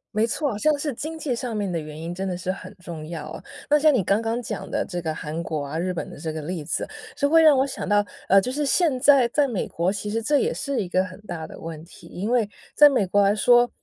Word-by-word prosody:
没 215 - +3
错， 245 -1 -2
像 305 +7 +3
是 295 0 -1
经 315 +6 -6
济 285 -5 -1
上 235 -2 -4
面 200 -3 -1
的 170 - -1
原 155 0 -8
因 170 +1 -5
真 190 +1 -3
的 180 - -2
是 180 +1 -2
很 195 - -9
重 165 -4 -8
要 155 -2 -6
啊。 - - -8 0.3
那 295 - +6
像 305 0 +5
你 220 -8 +2
刚 200 +4 +2
刚 230 +1 -2
讲 - - -5
的 - - 0
这 175 -2 -5
个 160 - -1
韩 155 +1 -5
国 155 -3 -3
啊、 145 +3 -4
日 180 +2 -1
本 170 - -4
的 - - -11
这 160 0 -4
个 155 - -4
例 160 -1 -5
子， - - -2 0.3
就 285 -1 +1
会 325 0 +6
让 305 -3 +7
我 270 - +3
想 - - -5
到， 205 0 +3 0.2
呃， 195 +1 +6
就 250 - -3
是 295 +2 -1
现 285 -3 +2
在 275 -3 +6
在 285 +4 +2
美 230 -7 -2
国 175 +4 -1
其 205 +1 -4
实 225 +2 -1
这 290 +3 +3
也 470 - +1
是 280 - -2
一 175 - -7
个 185 +1 +2
很 185 +1 -11
大 170 -6 -6
的 - - -11
问 160 -1 -7
题。 175 - -15
因 205 +6 -4
为 230 -4 +2 0.2
在 295 0 +8
美 240 -8 +2
国 200 +2 +2
来 200 +1 +3
说， 240 +3 +5
205 Hz, 305 characters per minute, -24 LUFS, 175-265 Hz, 0.3 s, 在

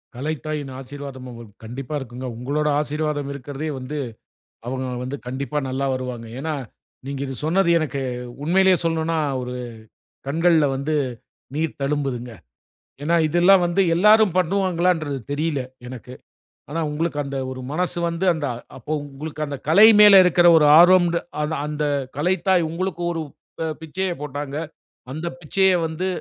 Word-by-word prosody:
கலைத்தாயின் 150 0 -4
ஆசீர்வாதம் 135 -1 -8
அவுங்களுக்கு 115 -4 -11
கண்டிப்பா 130 +5 -6
இருக்குங்க. 130 0 -8
உங்களோட 145 +5 -1
ஆசீர்வாதம் 150 -1 -2
இருக்கிறதே 140 +3 -5
வந்து, 140 +4 -6 0.7
அவுங்க 130 +1 -3 0.2
வந்து 130 +3 -4
கண்டிப்பா 140 +4 -3
நல்லா 135 +1 -1
வருவாங்க. 125 -3 -5
ஏன்னா, 155 +2 -3 0.5
நீங்க 140 -1 -4
இது 135 - -5
சொன்னது 170 +2 +2
எனக்கு 140 -3 -3 0.4
உண்மையிலேயே 185 +2 +4
சொல்லணும்னா, 165 0 0 0.2
ஒரு 125 0 -5 0.7
கண்கள்ல 165 0 +3
வந்து 150 +3 -1 0.6
நீர் 160 -1 -2
தழும்புதுங்க. 135 -4 -2 0.7
ஏன்னா, 170 +2 +2
இதெல்லாம் 175 +3 +5
வந்து 175 +3 +2
எல்லாரும் 210 -1 +5
பண்ணுவாங்களான்றது 175 -5 +1
தெரியல, 150 -1 -1 0.3
எனக்கு. 125 0 -9 0.6
ஆனா, 165 +1 -1
உங்களுக்கு 150 -1 -1
அந்த 140 0 -4
ஒரு 130 0 -7
மனசு 180 +1 -1
வந்து, 170 +3 -2
அந்த 150 -3 -3 0.3
அப்போ 150 - -7 0.2
உங்களுக்கு 150 +2 -5
அந்த 140 -1 -5
கலை 205 +7 +8
மேல 200 -2 +9
இருக்கிற 175 0 +5
ஒரு 150 - +5
ஆர்வம்ன்டு 175 -1 +5 0.2
அத 155 +1 -2
அந்த 150 0 -3 0.3
கலைத்தாய் 180 +1 +2
உங்களுக்கு 175 0 -3
ஒரு 165 - -3 0.4
அ - - -1 0.2
பிச்சைய 180 +4 -3
போட்டாங்க. 145 0 -5 0.5
அந்த 160 +4 -4
பிச்சைய 190 +4 +2
வந்து 170 +4 -3
150 Hz, 135 wpm, -22 LUFS, 135-175 Hz, 0.7 s, மேல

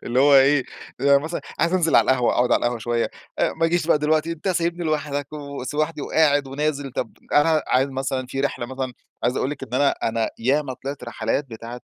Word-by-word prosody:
اللي 125 +2 +1
هو 140 0 +6
إيه 135 0 +5 0.4
مثلًا 140 +4 +2 0.2
عايز 170 +1 +2
أنزل 170 -3 +3
على - - +6
القهوة 125 -2 +2
أقعد 120 0 +2
على - - +5
القهوة 120 0 0
شويّة، 115 +1 -1 0.3
ما 165 0 +1
أجيش 170 -1 0
بقى 160 - +4
دلوقتي، 155 +2 +1
أنتَ 165 +4 -5
سايبني 175 -1 0
لوحدك 145 -2 -2
وس 140 -2 -6
ولوحدي 155 0 -1
وقاعد 145 -3 +2
ونازل، 140 -1 -2
طب - - -3 0.2
أنا 155 +1 +4
عايز 130 +2 +3
مثلًا 130 -1 -2
في 135 +2 -4
رحلة 130 -3 -2
مثلًا 130 0 -4 0.3
عايز 125 +2 +1
أقول 135 - 0
لِك 145 - -7
إن 120 - -6
أنا 140 +2 +4
أنا 115 0 -1
ياما 135 +4 +1
طلعت 135 0 -7
رحلات 120 +3 -2
بتاعة، 115 +2 -8
140 Hz, 200 wpm, -23 LUFS, 125-155 Hz, 0.4 s, هو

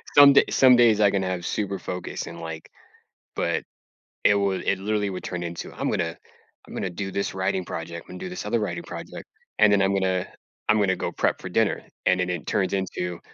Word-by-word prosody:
some 145 -1 +10
day - - +7
some 130 -2 +6
days 115 -3 +5
I 100 -2 +5
can 95 -1 0
have 90 -1 -3
super 100 -2 -2
focus 90 0 -5
and, - - -8
like 80 -1 -7 0.7
but, - - 0 0.6
it 105 - +6
would 100 -2 0
it, 100 - +2
literally, 105 0 0
would 90 - -6
turn 90 -1 -4
into 85 -1 -6
"I'm - - -2
gonna 85 -2 -1 0.5
I'm - - -11
gonna 95 - -2
do 95 +2 -4
this 100 0 -2
writing 95 -1 -1
project, 85 0 -6
I'm - - -11
gonna 90 - -8
do - - -5
this 180 -10 -6
other 115 +2 +1
writing 105 - -3
project, - - -8 0.3
and 105 -1 +6
then 100 -1 +4
I'm 95 0 +2
gonna 95 -1 0 0.4
I'm 110 - +4
gonna 95 -2 +2
go - - -2
prep - - 0
for - - -6
dinner." - - +1 0.2
And 90 0 +3
then 90 - 0
it 90 -3 -3
turns 95 -1 0
into, 90 -2 -2
95 Hz, 220 wpm, -25 LUFS, 90-105 Hz, 0.7 s, some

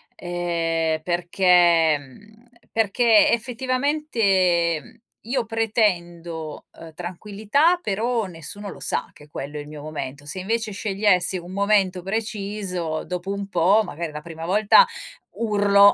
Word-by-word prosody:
Ehm, 165 -2 -1
perché, 175 -2 +3
mhmm, 210 - -17 0.3
perché, 225 0 +4
effettivamente, 230 - +1
mhmm, - - -18 0.2
io 240 +1 -2
pretendo, 175 -8 -1
uhm, 165 -1 -11
tranquillità, 210 - 0
però 225 - -1
nessuno 185 +3 -8
lo - - -10
sa - - -2
che 150 0 -17
quello 145 +1 -6
è - - -4
il 145 - -11
mio 150 -1 -9
momento. 145 -2 -6
Se 150 +6 -5
invece 220 +2 -2
scegliessi 195 -3 +1
un 175 +1 -9
momento 200 -2 +2
preciso, 195 -5 -3
dopo 180 +2 -4
un 200 0 -4
po', 190 +4 +3
magari 165 -1 -5
la 150 0 -7
prima 165 0 -8
volta 210 - +6 0.5
urlo, 205 -2 +4
190 Hz, 130 wpm, -23 LUFS, 170-215 Hz, 0.5 s, volta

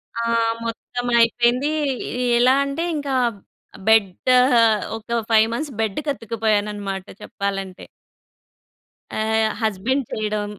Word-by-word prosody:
ఆ! 230 - -2 0.4
మొత్తం 245 +2 -5
అయిపోయింది. 240 +5 +2 0.5
ఎ - - -1 0.2
ఎలా 250 +2 +5
అంటే 280 +4 -3
ఇంకా 285 -2 -2 0.7
బెడ్ 220 -3 +5 0.3
ఆహ్, 250 0 +4 0.4
ఒక 235 +1 -2
5 220 0 +5
మంత్స్ 285 +2 -4
బెడ్ 220 +3 -1
కత్తుక్కుపోయానన్నమాట 210 -6 -2 0.2
చెప్పాలంటే. 195 -2 -5 1.3
ఆహ్, 220 0 +1
హస్బెండ్ 225 +6 0
చేయడం 210 -1 -2
225 Hz, 100 wpm, -21 LUFS, 210-250 Hz, 1.3 s, ఎలా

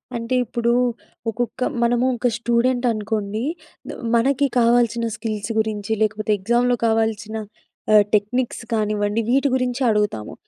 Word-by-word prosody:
అంటే, 235 +2 -2
ఇప్పుడూ 235 +1 0 0.6
ఒకొక్క 240 +3 -4 0.2
మనము 240 +1 +2
ఒక 245 - +1
స్టూడెంటనుకోండి. 235 -3 0 0.5
ద - - -3 0.2
మనకి 270 +4 +2
కావాల్సిన 235 0 +3
స్కిల్స్ 215 -1 -4
గురించి, 215 -1 -2
లేకపోతే 215 0 0
ఎగ్జామ్‌‌లో 240 +5 +2
కావాల్సిన 220 -1 0 0.6
ఆహ్, 210 -1 +7
టెక్నిక్స్ 230 +5 0
కానివ్వండి, 210 0 0
వీటి 270 +4 +3
గురించే 255 0 -1
అడుగుతాము. 210 - -1
230 Hz, 115 wpm, -21 LUFS, 215-245 Hz, 0.6 s, ఆహ్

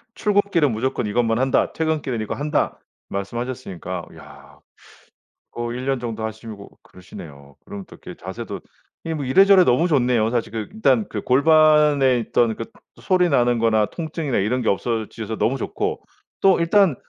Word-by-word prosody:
출근길은 200 - +1
무조건 120 +2 -2
이것만 115 +2 0
한다. 130 +1 +1
퇴근길은 155 -7 -2
이거 110 - -4
한다." 150 +1 -1 0.3
말씀하셨으니까 100 -4 -5
야. - - -15 0.9
어 120 0 -4
1 125 +1 -5
년 135 0 0
정도 115 -2 -5
하시고 110 -2 -8
그러시네요. 70 -6 -13
그럼 100 -1 -8
또 - - -13
이렇게 - - -10
자세도 - - -6 0.6
뭐 145 - -4
이래저래 190 +8 +6
너무 130 +7 +2
좋네요. 125 -7 +2
사실 120 -2 -2
그 110 -2 -4
일단 135 - +2
그 105 - -5
골반에 150 -1 +4
있던 115 0 +1
그 115 - -6 0.4
소리 180 -1 +2
나는 120 -5 +2
거나 110 -2 +2
통증이나 160 -3 -4
이런 115 +6 0
게 115 - -1
없어지셔서 110 +1 -2
너무 130 +4 +1
좋고 - - -3 0.4
또 195 -2 +4
일단 170 -1 +3
125 Hz, 335 characters per minute, -21 LUFS, 110-150 Hz, 0.9 s, 이래저래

